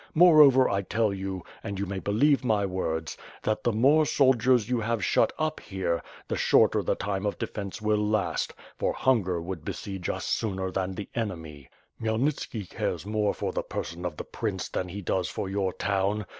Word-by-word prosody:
Moreover, 150 -6 +7
I 100 0 0
tell 105 +1 0
you, 95 -2 -4 0.2
and 100 -3 -4
youj 100 - -1
may 95 0 -3
believe 135 +10 +2
my 110 -5 +2
words, 80 -4 -2 0.3
that 110 0 -1
the 120 - +2
more 135 +8 +4
soldiers 130 -5 +3
you 125 -1 0
have 115 -2 -1
shut - - +3
up 155 0 -1
here, 95 -4 -2 0.3
the - - -1
shorter - - +4
the - - 0
time 95 0 -3
of 105 - -1
defence 100 0 -5
will 105 0 +2
last, 105 -2 0 0.2
for - - 0
hunger 100 -9 +1
would 85 -1 -6
besiege 95 -3 -5
us - - -3
sooner 95 -3 -1
than 95 0 -2
the 100 - -5
enemy. 80 - -5 0.3
Khmyelnitski 110 -2 -1
cares - - -2
more 105 0 0
for - - -2
the - - -1
person 85 +2 -5
of 85 -4 -4
the - - -4
prince - - -4
than 90 - -3
he 100 +3 -6
does 90 -1 0
for - - -4
your 95 -1 -1
town. 100 +2 -1
100 Hz, 185 wpm, -27 LUFS, 95-115 Hz, 0.3 s, Moreover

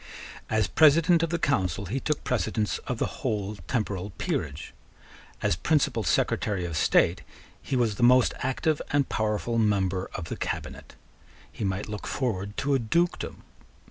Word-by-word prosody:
As 110 -1 +2
President 160 - +5
of 165 - 0
the 170 - 0
Council 100 - 0
he 115 +9 -2
took 150 +2 -2
precedence 110 -2 -1
of 125 - -2
the - - 0 0.2
whole 105 -4 -2
temporal 105 -7 -2
peerage. - - -3 0.7
As - - +2
Principal 150 - +1
Secretary 95 -4 0
of 85 -2 -4
State 75 - +3 0.4
he - - -3
was 115 -5 +1
the - - -4
most 125 +1 +5
active 145 +4 0
and 145 -2 +2
powerful 110 +2 0
member 95 -4 +1
of 90 - -4
the - - -5
cabinet. - - -5 0.6
He - - -6
might 95 +1 -2
look 105 -1 -6
forward 100 -6 -2
to 140 +1 0
a 135 - +3
dukedom. 170 +10 -1
110 Hz, 155 wpm, -27 LUFS, 100-140 Hz, 0.7 s, President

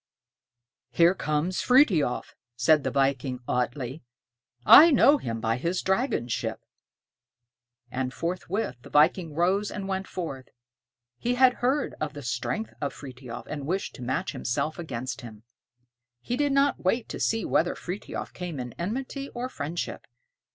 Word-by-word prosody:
"Here 170 +1 +4
comes 155 +1 -1
Frithiof," 210 - +3 0.2
said 145 +4 +4
the - - 0
viking 135 -1 0
Atlé. 125 +3 -2 0.6
"I 315 - +10
know 285 0 +5
him 115 - -4
by 115 +1 0
his 170 +7 -1
dragon 190 - 0
ship." 120 - -3 1.3
And 130 0 -2
forthwith 175 - -3
the - - -13
viking 160 +1 +3
rose 190 +5 +2
and 200 -2 -5
went 190 0 -2
forth; 140 -8 -6 0.7
he 245 +1 0
had 255 0 +6
heard 265 +4 +1
of 155 -1 -2
the 145 -1 -8
strength 125 - -3
of 140 -2 -2
Frithiof, 125 -3 -9
and 145 -2 -6
wished 190 +4 -2
to - - -11
match 125 +2 -2
himself 155 +7 -2
against 130 -5 -5
him. 110 -3 -11 0.8
He 240 - -3
did 290 +1 +1
not 275 +1 +2
wait 220 +5 +1
to - - -5
see 225 -3 0
whether 175 - +1
Frithiof 185 +3 -6
came 175 -6 -5
in 125 -2 -5
enmity 265 +9 -4
or 245 +1 -3
friendship. 155 - -5
165 Hz, 145 wpm, -27 LUFS, 130-210 Hz, 1.3 s, I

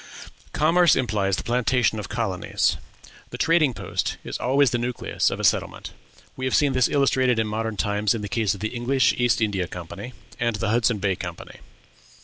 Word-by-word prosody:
Commerce 165 +1 +4
implies 105 -6 0
the - - -4
plantation 120 -1 +1
of 105 - -7
colonies; 110 -7 -1 0.5
the - - -7
trading 165 -4 +3
post - - -3
is - - -5
always 135 0 +3
the 120 - 0
nucleus 120 +1 -1
of - - -5
a - - -4
settlement; - - 0 0.4
we 130 - -7
have 130 - +1
seen 145 -2 +3
this 130 -1 +2
illustrated 130 -3 +2
in 110 - +1
modern 110 0 -3
times 105 +1 0
in 110 - -5
the - - -3
case 105 -1 0
of - - -11
the 110 - -1
English 125 +1 +2
East 120 -1 +2
India 100 -5 0
Company 90 +9 -8 0.3
and 115 -2 0
the 110 +1 -2
Hudson 115 0 +2
Bay 95 -1 0
Company. 85 0 -8
115 Hz, 185 wpm, -24 LUFS, 105-130 Hz, 0.5 s, Commerce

